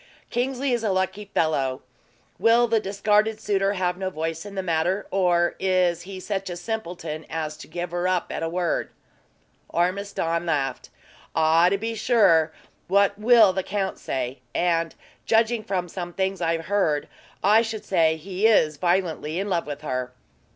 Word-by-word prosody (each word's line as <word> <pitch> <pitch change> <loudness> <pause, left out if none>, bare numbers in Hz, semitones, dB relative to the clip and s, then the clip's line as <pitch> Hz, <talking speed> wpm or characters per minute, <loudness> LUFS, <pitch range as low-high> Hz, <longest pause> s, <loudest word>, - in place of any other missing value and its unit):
"Kingsley 260 +2 0
is 235 -1 -1
a 215 - +1
lucky 190 +2 -1
fellow. 140 -9 0 0.6
Will 235 +1 +5
the 225 -1 +2
discarded 210 +2 +1
suitor 200 -2 +1
have 180 -2 -1
no 190 0 -2
voice 165 +2 -4
in 200 - -9
the 190 - -2
matter; 175 +3 0
or 175 -2 +2
is 180 -2 +2
he 190 -1 -6
such 195 0 -3
a 175 - -5
simpleton 175 -6 -5
as 155 -2 -3
to - - -11
give 175 +2 -5
her 175 +1 -1
up 185 -1 0
at - - -4
a 165 - -1
word?" 175 0 -1 0.8
Ormiston 175 -2 -1
laughed. 135 -5 -1 0.5
"Ah! 160 +2 +4
to 200 - +1
be 225 +3 -3
sure; 190 -9 +3 0.4
what 200 +1 +3
will 220 -3 +6
the 190 - -1
count 195 0 -3
say? 130 0 -3 0.2
And, 165 -2 +1 0.3
judging 225 0 +2
from 185 -4 -2
some 175 0 -6
things 190 +1 -1
I've 165 0 0
heard, 185 -8 +1 0.4
I 210 +3 +6
should 220 -2 -5
say 165 -4 +3
he 185 +6 0
is 155 -9 +3
violently 175 -2 0
in 200 +1 -2
love 170 -2 0
with 145 -1 -6
her." 130 -3 -3
185 Hz, 165 wpm, -24 LUFS, 165-205 Hz, 0.8 s, will